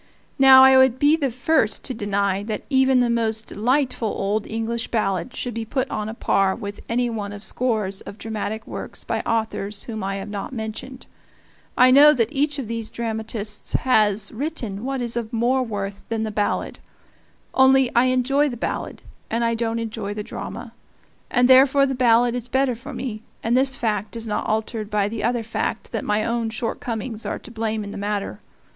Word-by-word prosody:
Now 265 -1 +9
I 265 0 +7
would 260 -1 +4
be 290 +3 +4
the 285 -4 -1
first 250 -1 +1
to 260 - -3
deny 200 -3 0
that 215 -1 -4
even 265 -1 +4
the 245 - +2
most 225 -1 0
delightful 250 +2 0
old 205 +1 -1
English 225 +1 -3
ballad 205 0 -1
should 245 - -4
be 230 +1 -3
put 260 +4 -2
on 215 0 -3
a 220 - -6
par 195 -4 +1
with 205 -3 -7
any 245 +1 +1
one 210 -3 -4
of 205 0 -9
scores 215 -7 -1
of 200 - -10
dramatic 220 0 -4
works - - -6
by - - -2
authors 215 -3 -2
whom 220 -3 -5
I 195 0 -2
have 195 +1 -6
not 205 +5 -5
mentioned; 240 +3 -6 0.7
I 255 +1 +7
know 295 +3 +8
that 230 +1 0
each 290 +1 0
of 265 -5 -4
these 230 -1 -4
dramatists 220 -2 -4
has 210 -5 +2
written 235 -6 -4
what 270 -2 -2
is 235 -1 -2
of 235 -2 -3
more 245 +3 +1
worth 200 -4 -4
than 225 -1 -1
the 220 - -3
ballad; 205 0 -2 0.7
only, 265 -1 +5
I 240 +2 +5
enjoy 265 +3 +2
the 240 - -6
ballad, - - -4 0.3
and 230 +1 0
I 230 - +1
don't 230 0 -1
enjoy 220 -3 -4
the 210 - -4
drama; - - -7 0.6
and 245 -1 +3
therefore 270 +2 +6
the 270 - -1
ballad 240 -1 +3
is 245 -1 -4
better 265 0 +1
for 255 +6 -9
me, 240 -5 -5 0.2
and 230 +2 +1
this 265 +1 +3
fact 215 -3 -2
is 230 - -4
not 215 - -2
altered 215 0 -2
by 210 -2 +1
the 215 0 -4
other 240 0 0
fact 225 - -3
that - - -3
my 210 +1 0
own 230 0 -1
shortcomings 225 0 -4
are - - -3
to 235 - -12
blame 220 -1 -2
in 200 - -7
the - - -6
matter. 205 0 -3
230 Hz, 195 wpm, -22 LUFS, 215-255 Hz, 0.7 s, Now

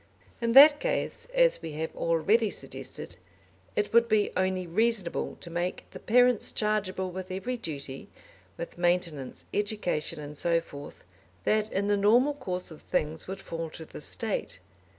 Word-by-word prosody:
In 230 0 +1
that 290 +3 +10
case, - - -2
as - - +3
we 165 -2 -6
have 160 +2 -4
already 195 +7 +2
suggested, - - -8 0.6
it 210 +1 0
would 235 0 +6
be 215 -1 +3
only 185 0 0
reasonable 200 0 0
to 170 - -8
make 175 +2 -3
the - - -9
parents 245 0 +4
chargeable 190 -3 -1
with 185 +1 -6
every 195 +7 -3
duty, 145 - -6 0.5
with 170 - -7
maintenance, 175 -6 0
education, 200 -7 -1
and 150 0 -8
so 170 +3 +2
forth, 145 -3 -11 0.4
that 215 0 +1
in 195 +1 0
the 205 0 +2
normal 240 +8 +4
course 185 -11 -4
of 155 - -11
things 160 -3 -2
would 190 +1 -6
fall 165 -2 -5
to 160 +1 -10
the - - -10
State. 220 - -3
185 Hz, 155 wpm, -28 LUFS, 165-220 Hz, 0.6 s, that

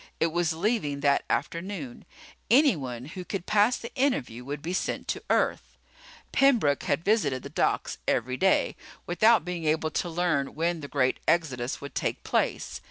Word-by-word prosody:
It 165 - +2
was 170 0 +1
leaving 165 -6 -1
that 140 -1 +3
afternoon. 170 -7 -3 0.4
Anyone 155 - +3
who 180 +5 -7
could 185 0 -5
pass 210 +3 +3
the 235 - -9
interview 250 - -1
would 145 +2 -6
be 175 +3 -3
sent 185 - -2
to - - -2
Earth. - - 0 0.5
Pembroke 235 - +3
had 145 +3 0
visited 155 - +1
the - - -7
docks - - 0
every 125 +2 0
day, 190 +7 +2 0.3
without 220 +6 +4
being 175 -2 -4
able 155 +1 +1
to 175 - -1
learn 160 -5 0
when 170 +2 0
the 145 - -6
great 130 -3 +1
exodus 135 -7 0
would 140 -1 -8
take - - -2
place. - - -1
165 Hz, 165 wpm, -27 LUFS, 140-195 Hz, 0.5 s, without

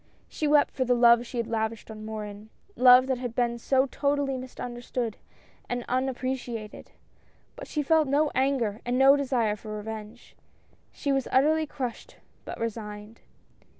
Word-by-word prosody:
She 305 - -3
wept 295 0 +4
for 260 - 0
the 250 -1 +2
love 235 0 +5
she 245 - -7
had 235 - 0
lavished 220 0 -3
on 215 0 -9
Morin, 215 -1 -7 0.3
love 250 0 +7
that 260 -2 -1
had 245 -2 -5
been 235 -1 0
so 265 +3 +2
totally 280 0 -1
misunderstood 245 -2 -5 0.5
and 245 0 -3
unap 260 +1 -1
preciated. 245 -4 -5 0.7
But - - -9
she 300 - -2
felt 315 +1 +3
no 290 +2 +2
anger 255 -5 0
and 245 +1 -1
no 270 +1 +7
desire 250 -7 0
for 215 0 -7
revenge. 220 +2 -8 0.6
She 280 - -3
was 270 -1 0
utterly 310 +4 +3
crushed, 255 -5 -6 0.3
but - - -7
resigned. 215 -1 -6
245 Hz, 155 wpm, -27 LUFS, 225-270 Hz, 0.7 s, love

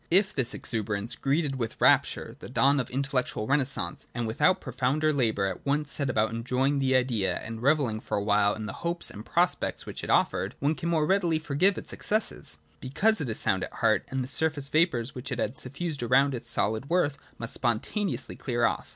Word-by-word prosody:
If 190 +3 +4
this 130 -3 -1
exuberance 110 0 -1
greeted 140 +1 0
with 115 -3 -4
rapture - - +3
the - - -9
dawn 140 +3 +3
of 125 - -2
the - - -15
intellectual 135 -5 -1
renascence, 130 -9 -1
and 120 -1 -2
without 150 +12 +2
pro - - -8
founder 150 +5 +1
labour 110 -7 +1
at 95 -2 -4
once 145 +1 -1
set 140 -2 -1
about 110 -2 +1
enjoying 130 +5 0
the 130 -1 +2
Idea 115 -8 +1
and 115 0 -7
revelling 135 -5 +2
for - - -3
a 100 - -1
while 105 0 +3
in 110 - -6
the 110 - -5
hopes 170 0 0
and 105 - -9
prospects 175 +8 0
which - - -7
it - - -5
offered, - - +1
one 145 +3 +1
can 170 +1 -4
more 160 -3 +2
readily 175 -2 +2
forgive 155 +6 +1
its - - -5
excesses; 215 +1 -1 0.2
because 200 +10 +1
it 140 - -3
is 110 - -2
sound 95 -1 +1
at - - -6
heart, 110 -3 +2
and 130 -1 -2
the - - -6
surface 145 0 +1
vapours 140 -7 +1
which 130 +1 -7
it - - -2
had 125 - -2
suffused 145 +3 -4
around 135 +4 +3
its 120 -1 -5
solid 110 +3 0
worth 155 -5 +1 0.2
must 115 - -4
spontaneously 125 - -1
clear 120 -3 0
off. - - -1
130 Hz, 210 wpm, -27 LUFS, 115-150 Hz, 0.2 s, If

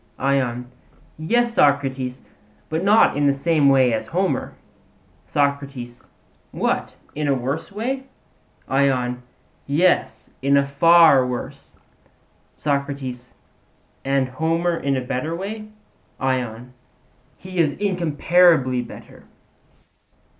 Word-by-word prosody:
ION: 125 -2 -1 0.5
Yes, 235 +9 +1
Socrates; 135 - +1 0.5
but 160 +2 -2
not 210 -3 +4
in 145 0 +2
the - - +5
same 145 0 +2
way 130 -3 +4
as 110 - -3
Homer. 185 +2 -1 0.7
SOCRATES: 140 -4 -2 0.4
What, - - -2 0.2
in 150 0 -2
a 140 - +2
worse 135 +9 -4
way? 260 +6 -3 0.6
ION: 130 -2 0 0.5
Yes, 165 +6 +1
in 140 +1 +3
a 140 - +3
far 155 0 +5
worse. 125 -1 -7 0.8
SOCRATES: 140 -4 -4 0.7
And 135 -1 +1
Homer 165 +6 -1
in 140 -4 -1
a - - -1
better 135 +6 -3
way? 215 +4 -6 0.5
ION: 125 -2 -3 0.6
He 185 -1 -7
is 155 -4 +3
incomparably 170 -7 +2
better. 120 - -12
140 Hz, 105 wpm, -21 LUFS, 130-170 Hz, 0.8 s, the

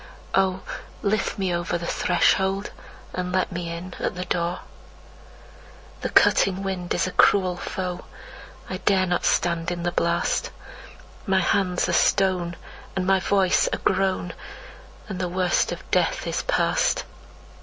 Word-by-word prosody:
Oh, 190 -1 +2 0.4
lift 210 0 0
me 190 -3 0
over 170 0 -1
the 170 - -6
threshold, 190 +3 +1 0.4
and 180 0 -3
let 185 +1 0
me 175 -1 -4
in 170 +2 -6
at - - -2
the 180 +1 -4
door! 175 -1 -1 1.4
The - - -2
cutting 195 0 +4
wind 185 -2 -4
is - - +1
a 185 - -3
cruel 185 -2 +4
foe. 180 0 -4 0.6
I 185 - -4
dare 190 0 +2
not 175 -1 0
stand 170 -1 +1
in 175 -1 -4
the 175 - 0
blast. 170 0 0 0.8
My 190 -1 +3
hands 180 -1 +1
are 175 - -1
stone, 180 -2 +2 0.4
and 190 -1 -1
my 190 0 +4
voice 190 0 +2
a - - 0
groan, 190 -2 0 0.7
And 190 -4 -5
the 180 -1 -1
worst 180 -1 +1
of - - -8
death - - +1
is - - -1
past. - - +1
185 Hz, 145 wpm, -24 LUFS, 175-190 Hz, 1.4 s, cutting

